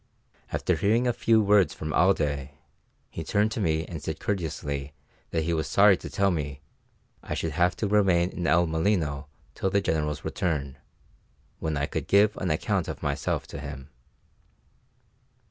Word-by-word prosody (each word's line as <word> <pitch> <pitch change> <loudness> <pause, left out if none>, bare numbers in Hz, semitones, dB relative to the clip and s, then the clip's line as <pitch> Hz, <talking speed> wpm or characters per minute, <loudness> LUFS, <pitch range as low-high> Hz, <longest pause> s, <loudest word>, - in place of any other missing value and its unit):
After - - 0
hearing 115 +5 +2
a 120 - +2
few 115 -1 +3
words 100 -2 +4
from 80 0 -4
Alday, 75 -6 +1 0.6
he 80 - -5
turned 105 +6 +1
to 110 - -3
me 80 -4 0
and - - -7
said - - -4
courteously 75 -7 -3 0.4
that 80 -1 -1
he 85 +2 0
was 80 -1 -1
sorry 100 0 +6
to - - -8
tell 100 0 +2
me 70 -5 -3 0.6
I - - -4
should 80 - -2
have 90 +4 +2
to 105 - -2
remain 95 -4 +3
in 85 -2 -3
El 85 +3 +4
Molino 80 -4 0 0.3
till 95 - -1
the 100 - +2
General's 75 -5 -1
return, 70 -6 -2 0.8
when 80 -2 -2
I 70 - 0
could - - -4
give 100 +1 +4
an 95 - -2
account 75 - 0
of - - -6
myself - - -1
to - - -7
him. 70 -1 -8
85 Hz, 165 wpm, -27 LUFS, 75-100 Hz, 0.8 s, sorry